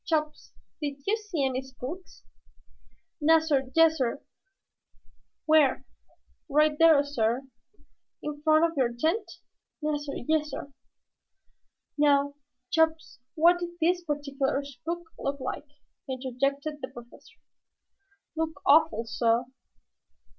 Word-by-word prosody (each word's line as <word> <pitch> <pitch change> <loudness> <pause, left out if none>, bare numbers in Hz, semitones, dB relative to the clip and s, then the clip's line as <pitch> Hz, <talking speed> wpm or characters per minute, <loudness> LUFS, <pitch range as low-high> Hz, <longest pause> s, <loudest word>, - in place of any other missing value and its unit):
Chops, 305 -2 -2 0.3
did 285 -2 -4
you 420 - +2
see 410 -10 -2
any 260 0 -1
spooks?" 265 +7 -9 1.0
"Nassir, 300 -4 +3
yassir." 315 -6 +3 1.2
"Where?" 300 -4 +4 0.6
"Right 300 +1 +3
dar, 315 -2 +6
sah." 245 -3 0 0.8
"In 295 -1 -5
front 310 +1 +4
of 335 0 -2
your 255 -4 +1
tent?" 345 - -1 0.5
"Nassir, 295 -2 -2
yassir." 300 -3 -1 1.3
"Now, 285 -1 +3 0.4
Chops, 320 -3 +1 0.2
what 345 +2 +5
did 345 0 -6
this 350 +2 +2
particular 285 -2 -2
spook 315 +6 -6 0.2
look 280 +1 -3
like?" 275 +3 -5 0.4
interjected 275 +3 -2
the 260 - -4
Professor. 240 -2 -14 1.0
"Look 320 -2 -3
awful, 255 -6 +4
sah!" 230 +1 +1
295 Hz, 100 wpm, -27 LUFS, 270-320 Hz, 1.3 s, dar